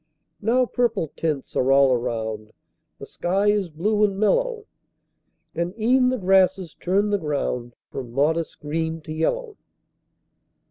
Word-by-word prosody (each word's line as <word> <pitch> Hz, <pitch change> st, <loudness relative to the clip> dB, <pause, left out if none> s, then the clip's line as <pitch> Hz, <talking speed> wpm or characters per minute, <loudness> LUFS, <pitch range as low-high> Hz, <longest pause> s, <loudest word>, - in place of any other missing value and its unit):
Now 245 Hz, +4 st, +3 dB
purple 230 Hz, -, -1 dB
tints 155 Hz, -4 st, -3 dB
are 130 Hz, +1 st, +2 dB
all 135 Hz, -1 st, +5 dB
around; 110 Hz, -3 st, -3 dB, 0.4 s
The -, -, -9 dB
sky 195 Hz, +4 st, +1 dB
is 205 Hz, -4 st, 0 dB
blue 205 Hz, +7 st, 0 dB
and 200 Hz, -2 st, +1 dB
mellow; 460 Hz, -, +1 dB, 0.9 s
And 175 Hz, +6 st, -3 dB
e'en 250 Hz, +3 st, +4 dB
the 255 Hz, -, 0 dB
grasses 190 Hz, -3 st, +2 dB
turn 200 Hz, +3 st, 0 dB
the 205 Hz, -, +1 dB
ground 130 Hz, -6 st, -3 dB, 0.2 s
From 125 Hz, -3 st, -6 dB
modest 155 Hz, +6 st, 0 dB
green 160 Hz, +2 st, -2 dB
to 155 Hz, 0 st, -7 dB
yellow. 435 Hz, -, -2 dB
180 Hz, 135 wpm, -23 LUFS, 145-210 Hz, 0.9 s, all